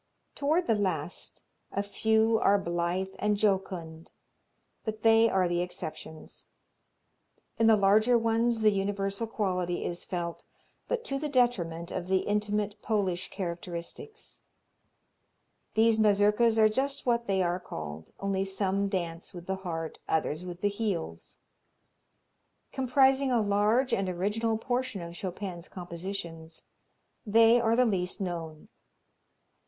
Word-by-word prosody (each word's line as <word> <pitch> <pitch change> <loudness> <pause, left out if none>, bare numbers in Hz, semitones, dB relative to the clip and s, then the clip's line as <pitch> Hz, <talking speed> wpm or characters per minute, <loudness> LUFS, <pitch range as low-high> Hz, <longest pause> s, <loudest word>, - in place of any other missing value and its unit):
Toward 310 +5 +1
the 225 - +3
last, 180 -6 -3 0.3
a 200 - -1
few 220 +2 +2
are 200 - +4
blithe 175 +1 -2
and 210 0 +1
jocund, 185 -6 -1 0.7
but 215 -1 -5
they 225 0 +6
are 190 -3 +2
the 175 0 0
exceptions. 160 -3 -7 1.1
In 225 - +5
the 220 -1 +6
larger 215 +5 +4
ones 230 0 +1
the 215 -1 +5
universal 200 +2 -1
quality 185 -5 -1
is 175 0 -3
felt, 170 -2 -4 0.4
but 480 -2 -1
to 275 -8 -2
the 300 +1 -3
detriment 180 - +1
of 180 -1 -4
the 190 0 +2
intimate, 210 0 -1
Polish 190 -5 -1
characteristics. 180 - -6 1.3
These 220 0 +4
Mazurkas 210 +2 +4
are 220 -1 +7
just 270 +6 -1
what 235 -1 +1
they 190 -2 +2
are 175 +1 0
called, 80 - -8
only 195 -1 0
some 195 0 0
dance 175 -3 -4
with 175 -1 -8
the 190 0 -2
heart, 165 -4 -5
others 160 +1 0
with 180 0 -8
the 205 - +2
heels. 200 - -4 1.3
Comprising 265 +1 +3
a 240 - +3
large 215 +5 +2
and 195 -1 +1
original 210 +5 0
portion 245 -4 -2
of 170 0 -8
Chopin's 185 -1 -5
compositions, 170 -2 -7 0.6
they 230 +2 +5
are 230 0 +2
the 250 +1 +4
least 185 -5 -1
known. 165 -5 -5
200 Hz, 130 wpm, -29 LUFS, 175-225 Hz, 1.3 s, are